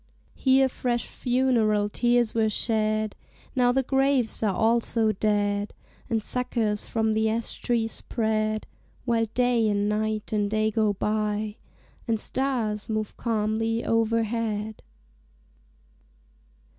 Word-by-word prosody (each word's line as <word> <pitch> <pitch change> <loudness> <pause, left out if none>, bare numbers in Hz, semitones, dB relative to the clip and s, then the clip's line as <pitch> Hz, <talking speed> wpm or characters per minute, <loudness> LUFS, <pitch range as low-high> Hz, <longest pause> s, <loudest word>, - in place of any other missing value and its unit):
Here 265 0 +3
fresh 245 -2 -2
funeral 240 -5 +1
tears 240 +1 +1
were 220 -1 +2
shed; 215 -1 0 0.4
Now 245 -1 +4
the 265 +1 +1
graves 270 -2 +1
are 210 -3 +1
also 225 -1 +2
dead; 205 0 0 0.3
And 225 -3 0
suckers 225 -4 0
from 220 -1 0
the 220 0 +1
ash 225 +1 -3
tree 235 -2 +1
spread, 215 -1 -1 0.4
While 230 -2 +1
Day 245 -3 +3
and 205 0 +1
Night 215 0 -1
and 205 -1 +1
Day 215 0 +1
go 215 -1 +1
by; 210 +1 -1 0.5
And 225 -2 +1
stars 230 -5 -2
move 215 -1 -2
calmly 225 0 -1
overhead. 225 -1 0
220 Hz, 115 wpm, -26 LUFS, 215-235 Hz, 0.5 s, Now